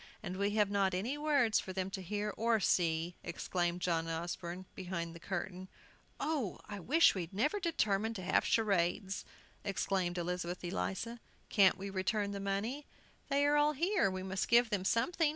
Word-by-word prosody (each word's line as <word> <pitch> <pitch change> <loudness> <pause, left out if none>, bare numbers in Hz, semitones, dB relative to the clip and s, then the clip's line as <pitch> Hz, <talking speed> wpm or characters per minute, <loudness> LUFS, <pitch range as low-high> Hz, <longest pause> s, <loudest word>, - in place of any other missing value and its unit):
"And 185 -2 -4
we 200 +1 +1
have 210 -2 +3
not 195 -2 +2
any 225 +10 -1
words 285 -7 +3
for 185 - -6
them 190 0 -2
to 190 - -4
hear 205 +3 -2
or 230 0 +2
see!" 170 -2 +1
exclaimed 175 -1 -2
John 165 -2 0
Osborne, 170 +2 -4
behind 170 -3 -4
the 170 - -10
curtain. 185 +1 -4 0.5
"Oh, 280 - -1
I 205 -1 -6
wish 300 - +5
we'd 175 -4 -4
never 295 - +1
determined 225 - 0
to 185 - -5
have 180 - +3
charades! 195 -2 +1 0.4
exclaimed 190 -3 -1
Elizabeth 180 0 -3
Eliza. 175 - -3 0.3
"Can't 195 -4 +5
we 195 +1 -5
return 200 +2 0
the 200 - -4
money?" 205 +9 -2 0.4
"They 280 0 +3
are 290 0 +4
all 295 +1 +4
here; 350 - +2
we 185 0 -4
must 190 0 -2
give 235 0 +5
them 195 -3 0
something!" 320 - +2
195 Hz, 170 wpm, -34 LUFS, 180-230 Hz, 0.5 s, wish